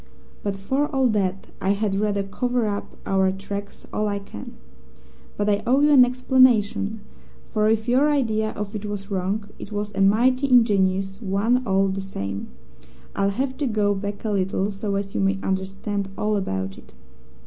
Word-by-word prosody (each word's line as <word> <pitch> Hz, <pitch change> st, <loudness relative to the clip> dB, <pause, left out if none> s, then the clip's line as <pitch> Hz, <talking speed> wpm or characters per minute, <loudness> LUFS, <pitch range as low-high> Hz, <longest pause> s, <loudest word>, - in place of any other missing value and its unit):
But 200 Hz, -1 st, -2 dB
for 265 Hz, +9 st, 0 dB
all 270 Hz, -3 st, +1 dB
that, 195 Hz, -3 st, 0 dB, 0.2 s
I 195 Hz, +1 st, +2 dB
had 205 Hz, -1 st, -1 dB
rather 205 Hz, -1 st, 0 dB
cover 245 Hz, +4 st, -1 dB
up 205 Hz, -1 st, -4 dB
our 190 Hz, -1 st, +2 dB
tracks 200 Hz, +1 st, -7 dB
all 215 Hz, -, 0 dB
I 200 Hz, -1 st, -1 dB
can. 195 Hz, -, -9 dB, 0.8 s
But 205 Hz, -, 0 dB
I 205 Hz, 0 st, +2 dB
owe 265 Hz, +3 st, +4 dB
you 295 Hz, +1 st, +5 dB
an 270 Hz, -3 st, +8 dB
explanation, 245 Hz, -4 st, +3 dB, 0.4 s
for 215 Hz, 0 st, +1 dB
if 220 Hz, +1 st, +1 dB
your 260 Hz, +5 st, +4 dB
idea 220 Hz, -7 st, +1 dB
of 210 Hz, 0 st, -5 dB
it 210 Hz, -1 st, -5 dB
was 205 Hz, -1 st, -5 dB
wrong, 195 Hz, +2 st, -1 dB
it 200 Hz, -, -8 dB
was 205 Hz, 0 st, -3 dB
a 195 Hz, -, -1 dB
mighty 255 Hz, +7 st, +3 dB
ingenious 195 Hz, -4 st, +3 dB
one 215 Hz, +5 st, +1 dB
all 195 Hz, 0 st, +3 dB
the 195 Hz, 0 st, -2 dB
same. 100 Hz, -, -5 dB, 0.7 s
I'll 200 Hz, 0 st, +2 dB
have 260 Hz, +6 st, -2 dB
to 290 Hz, -, -1 dB
go 210 Hz, -3 st, +2 dB
back 205 Hz, +2 st, -5 dB
a 215 Hz, -, 0 dB
little 195 Hz, 0 st, 0 dB
so 200 Hz, 0 st, -3 dB
as 195 Hz, 0 st, -3 dB
you -, -, 0 dB
may 195 Hz, 0 st, +2 dB
understand 195 Hz, +1 st, -2 dB
all 210 Hz, 0 st, 0 dB
about 95 Hz, -, -3 dB
it. -, -, -19 dB
205 Hz, 180 wpm, -23 LUFS, 195-225 Hz, 0.8 s, an